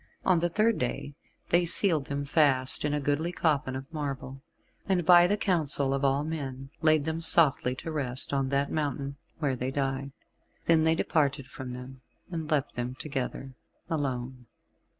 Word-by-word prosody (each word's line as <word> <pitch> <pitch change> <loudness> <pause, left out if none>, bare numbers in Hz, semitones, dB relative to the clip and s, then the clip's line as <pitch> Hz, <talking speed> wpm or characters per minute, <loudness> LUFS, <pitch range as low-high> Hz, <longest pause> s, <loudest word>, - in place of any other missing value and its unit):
On 180 -3 +4
the 175 +1 0
third 215 +5 +1
day 125 +3 -3 0.4
they 175 +1 +4
sealed 165 -3 +1
them 140 +1 -3
fast 140 -3 +3
in 150 - 0
a 150 - 0
goodly 145 +4 -1
coffin 150 -6 0
of 130 0 -5
marble, 135 -3 -5 0.5
and 180 -3 +1
by 175 0 +7
the 205 +3 +1
counsel 150 -9 +1
of 140 +1 -2
all 135 +1 +2
men, 135 -4 -5
laid 155 -2 +3
them 160 +1 -2
softly 150 -6 +5
to 160 - -6
rest 135 -4 0
on 135 -1 0
that 140 +1 0
mountain 140 -2 -3 0.2
where 145 -5 -1
they 125 +1 -3
died. 135 0 -2 0.5
Then 160 -1 +4
they 160 0 +3
departed 145 -5 0
from 130 0 -8
them, 125 +1 -10 0.3
and 160 -3 -4
left 145 -3 0
them 125 +1 -4
together, 135 -1 -5 0.4
alone. 130 -4 -3
140 Hz, 170 wpm, -28 LUFS, 135-160 Hz, 0.5 s, by